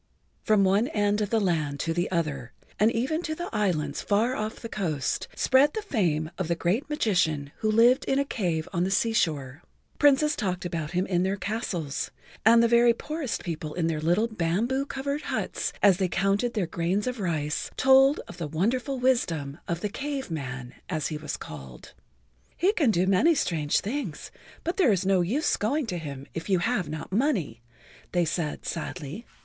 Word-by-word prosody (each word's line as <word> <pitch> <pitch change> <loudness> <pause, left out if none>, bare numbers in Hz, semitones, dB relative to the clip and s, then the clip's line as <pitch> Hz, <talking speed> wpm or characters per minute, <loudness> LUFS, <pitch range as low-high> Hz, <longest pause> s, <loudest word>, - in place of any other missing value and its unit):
From 215 -2 +3
one 200 +5 +3
end 205 -1 +1
of 205 - -1
the 225 - +2
land 155 -7 0
to 165 - -1
the 175 +1 -1
other, 150 -8 -2 0.3
and 215 +2 +5
even 265 +9 -1
to 315 -2 -3
the 345 +2 -5
islands 165 -9 0
far 225 +5 +1
off 215 -1 -3
the 230 - -8
coast, 160 - -2
spread 275 +3 +4
the 435 - -2
fame 165 - 0
of 185 - -1
the 170 - +1
great 190 - -1
magician 160 - +1
who 215 - 0
lived 235 +5 +5
in 270 - +1
a 280 - +2
cave 175 - -2
on 175 -1 +1
the 185 - 0
sea 225 +4 +1
shore. 145 - -1 0.4
Princes 290 +1 +4
talked 185 -2 -2
about 165 -2 -3
him 180 +1 +1
in 175 -2 +1
their 190 +2 +1
castles, 190 -8 -3 0.3
and 230 +2 +6
the - - +5
very 235 0 +5
poorest 300 -2 -4
people 155 -3 -5
in 175 -2 0
their 160 -2 -1
little 175 +8 +2
bamboo 225 +7 -1
covered 280 +2 -3
huts - - -2
as 195 -4 +6
they 190 -1 +1
counted 195 +7 0
their 205 -4 +1
grains 170 +4 -1
of 250 -2 -3
rice 155 -5 -1
told 270 +2 +5
of - - -10
the 165 - -3
wonderful 240 - -1
wisdom 170 - 0
of 170 0 -2
the - - 0
Cave 275 - -4
Man, 130 -5 -5 0.2
as 155 -4 -1
he 155 - -3
was 155 - -5
called. 65 -5 -10 0.6
"He 380 +5 +3
can 300 - +2
do 185 -4 +2
many 240 - +4
strange 155 - +1
things, 215 - -4 0.3
but 340 - -2
there 335 - +5
is 190 -2 +1
no 190 -1 +3
use 250 - +1
going 275 +8 0
to 180 -6 -3
him 140 -4 -7
if 165 +4 -6
you 190 - +4
have 185 -3 0
not 155 +3 -6
money," 195 - 0 0.5
they 175 -1 +3
said 160 -2 -3
sadly. 165 - -5
195 Hz, 190 wpm, -27 LUFS, 165-240 Hz, 0.6 s, and